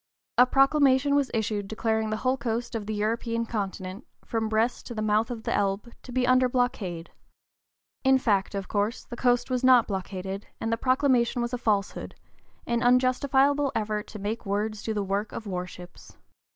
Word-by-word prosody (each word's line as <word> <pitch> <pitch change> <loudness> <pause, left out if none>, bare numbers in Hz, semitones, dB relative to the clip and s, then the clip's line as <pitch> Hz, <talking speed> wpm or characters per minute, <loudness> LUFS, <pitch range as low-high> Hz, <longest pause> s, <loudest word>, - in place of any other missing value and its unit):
A 250 - +8
proclamation 275 0 +4
was 285 -2 +2
issued 215 -3 -1
declaring 220 0 -1
the 215 - -1
whole 255 +3 +1
(p. 265 - -18
041) 225 -1 +1
coast 245 - -11
of 220 -3 -4
the 215 - -2
European 230 +2 -1
continent, 195 -1 -5 0.2
from 225 -1 -2
Brest 220 +3 0
to 240 - -7
the 215 - -2
mouth 215 +1 +2
of 235 -2 -6
the - - -1
Elbe, 200 +4 -1
to 255 - -11
be 255 0 +1
under 255 0 +4
blockade. 200 -9 -2 0.9
In 265 0 +5
fact, 205 -5 0
of 195 -2 -4
course, 210 +3 -1
the 240 - -9
coast 245 +1 +1
was 255 0 0
not 255 -3 +6
blockaded, 190 0 -5
and 225 0 -1
the - - 0
proclamation 255 -1 +2
was 240 +1 -4
a 250 - -2
falsehood, 205 -4 -1 0.5
an 235 0 0
unjustifiable 265 +3 +3
effort 210 -1 -2
to - - -9
make 210 +3 -4
words 210 +1 -2
do 220 0 -3
the 205 - 0
work 200 +2 -2
of 225 - -6
war 180 -2 -3
ships. 180 -1 -13
225 Hz, 190 wpm, -27 LUFS, 205-250 Hz, 0.9 s, A